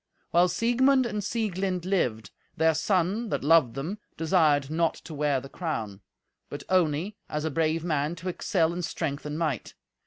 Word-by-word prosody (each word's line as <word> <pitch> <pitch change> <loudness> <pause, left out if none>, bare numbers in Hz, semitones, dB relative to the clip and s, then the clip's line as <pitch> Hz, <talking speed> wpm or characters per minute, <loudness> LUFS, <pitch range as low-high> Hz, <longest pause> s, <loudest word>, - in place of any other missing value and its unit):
While 175 +1 +5
Siegmund 245 +8 +3
and 210 -3 -3
Sieglind 190 -5 -2
lived, 125 - 0 0.3
their 160 0 +4
son, 190 - 0
that - - -2
loved 145 -6 +4
them, 165 +10 -4 0.2
desired 155 -4 +2
not 165 +1 +1
to 165 - -10
wear 145 -2 +1
the 135 - -10
crown, 110 - -4 0.5
but 145 - -7
only, 180 +2 +1
as 150 +1 -2
a 160 - -1
brave 160 +2 0
man, 155 -1 0
to 175 +2 -8
excel 170 -2 0
in 180 - -3
strength 155 -3 -3
and 150 +1 -4
might. 155 -8 -2
165 Hz, 165 wpm, -27 LUFS, 150-185 Hz, 0.5 s, While